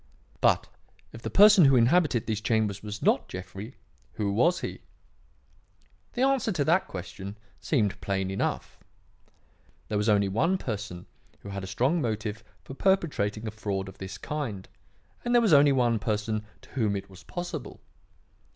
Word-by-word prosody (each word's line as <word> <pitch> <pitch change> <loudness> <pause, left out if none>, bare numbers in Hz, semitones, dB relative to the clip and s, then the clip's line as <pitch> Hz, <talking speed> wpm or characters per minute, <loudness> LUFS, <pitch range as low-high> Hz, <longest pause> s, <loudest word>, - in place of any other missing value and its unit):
"But, - - +3 0.5
if 115 - -10
the - - -4
person 200 -4 +7
who 135 -1 +6
inhabited 125 0 +3
these 110 -2 -2
chambers 105 -3 0
was 105 0 -6
not - - +2
Jeffrey, 95 +5 -8 0.4
who 100 -2 -1
was 170 - +3
he? - - -5 1.3
"The 250 - 0
answer 270 -4 +2
to 145 -5 0
that 170 +4 +3
question 95 +2 -7 0.2
seemed 110 -10 0
plain 95 -1 -1
enough. 95 - -3 1.1
There 105 - 0
was 105 +2 +1
only 100 -1 +4
one 165 - +1
person 105 - -5 0.4
who 100 - -9
had 100 -1 -5
a - - -5
strong 130 - +1
motive 110 -2 -3 0.2
for - - -9
perpetrating 135 - 0
a 110 - -3
fraud 100 -2 -3
of 95 - -12
this 95 0 -6
kind, 115 -6 -4 0.6
and 240 0 +1
there - - +8
was 210 - +4
only 145 0 +7
one 120 -4 +2
person 105 0 -2 0.2
to - - -17
whom 110 -6 0
it 100 0 -5
was 95 -1 -14
possible. 175 - -6
110 Hz, 160 wpm, -27 LUFS, 100-145 Hz, 1.3 s, there